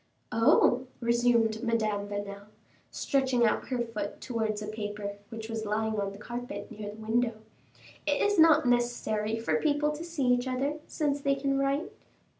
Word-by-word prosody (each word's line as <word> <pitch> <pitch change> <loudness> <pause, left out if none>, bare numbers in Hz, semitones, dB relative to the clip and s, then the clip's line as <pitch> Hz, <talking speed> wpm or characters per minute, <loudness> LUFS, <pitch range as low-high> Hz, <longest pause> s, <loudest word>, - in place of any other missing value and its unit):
"Oh!" 240 +3 +4
resumed 235 -2 +2
Madame 215 -4 0
Vanel, 205 0 -5 0.4
stretching 260 -3 +1
out 215 - +1
her 255 - -1
foot 225 -4 -4
towards 220 -3 -2
a 210 - -5
paper 210 -1 -5
which 225 -1 -6
was 225 -1 -3
lying 215 0 -1
on 200 -1 -1
the 200 - -10
carpet 245 +5 -6
near 210 -1 -6
the 205 - -8
window; 225 +2 0 0.7
"it - - +2
is 410 -3 +2
not 320 -2 +7
necessary 240 -3 +1
for 225 - 0
people 295 -1 +2
to 300 +2 -6
see 335 -5 -2
each 245 +1 +2
other, 275 +4 -1
since 285 -2 -1
they 275 0 +2
can 275 0 0
write." 275 +4 0
235 Hz, 165 wpm, -29 LUFS, 215-270 Hz, 0.7 s, not